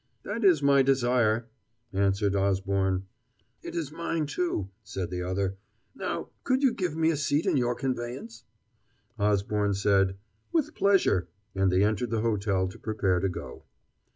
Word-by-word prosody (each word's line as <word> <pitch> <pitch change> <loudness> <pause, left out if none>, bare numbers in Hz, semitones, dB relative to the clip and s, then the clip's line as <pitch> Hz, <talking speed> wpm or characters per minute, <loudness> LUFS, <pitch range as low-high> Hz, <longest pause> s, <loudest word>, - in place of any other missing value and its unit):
"That 215 +3 -4
is 175 -7 +5
my 140 -1 +5
desire," 120 -4 +2 0.5
answered 100 +1 +1
Osborne. 95 -1 +1 0.6
"It - - -7
is 160 -4 -3
mine, 165 -1 -2
too," 140 - -2
said 95 -4 -5
the 90 0 -3
other; 95 +1 -2 0.4
"now, - - -4
could 260 +1 +1
you 260 -4 +4
give 175 -5 -2
me 160 0 +3
a - - 0
seat 145 +1 0
in - - +2
your 120 -2 +1
conveyance?" 120 -2 -4 0.8
Osborne 105 0 +1
said, 95 -1 +2 0.3
"With 325 -5 +1
pleasure," 190 - +3 0.3
and 95 -1 +2
they 90 +2 +3
entered 110 +3 0
the 115 -1 0
hotel 100 -4 +1
to - - -12
prepare 95 -4 0
to 95 - 0
go. 90 - -8
110 Hz, 155 wpm, -28 LUFS, 95-140 Hz, 0.8 s, is